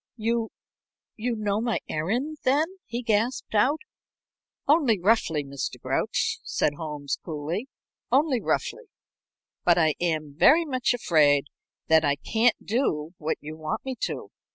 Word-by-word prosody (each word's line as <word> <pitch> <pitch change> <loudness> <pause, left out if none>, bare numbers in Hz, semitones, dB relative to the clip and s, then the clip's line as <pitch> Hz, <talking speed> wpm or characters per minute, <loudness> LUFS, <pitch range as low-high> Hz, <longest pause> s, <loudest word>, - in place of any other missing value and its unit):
"You 225 0 0 0.7
you 235 +2 -2
know 210 -1 -1
my 235 -1 0
errand, 245 - -2
then?" 285 +4 +3 0.2
he 240 +2 -4
gasped 225 +2 0
out. 270 +9 +3 0.9
"Only 275 - +4
roughly, 175 -6 +2
Mr. 140 -1 -5
Grouch," - - -1
said 145 - 0
Holmes, 145 -2 -4
coolly. 165 - -4 0.4
"Only 270 -2 +3
roughly. - - -1 0.8
But 175 -1 +4
I 160 -3 +4
am 155 -4 -1
very 320 - +6
much 255 -4 +1
afraid 145 - +3 0.4
that 160 0 +5
I 145 -2 +2
can't 225 - +1
do 170 - 0
what 155 +1 -1
you 155 +1 -7
want 155 +7 -4
me 265 - -2
to. - - -6
210 Hz, 135 wpm, -26 LUFS, 155-245 Hz, 0.9 s, very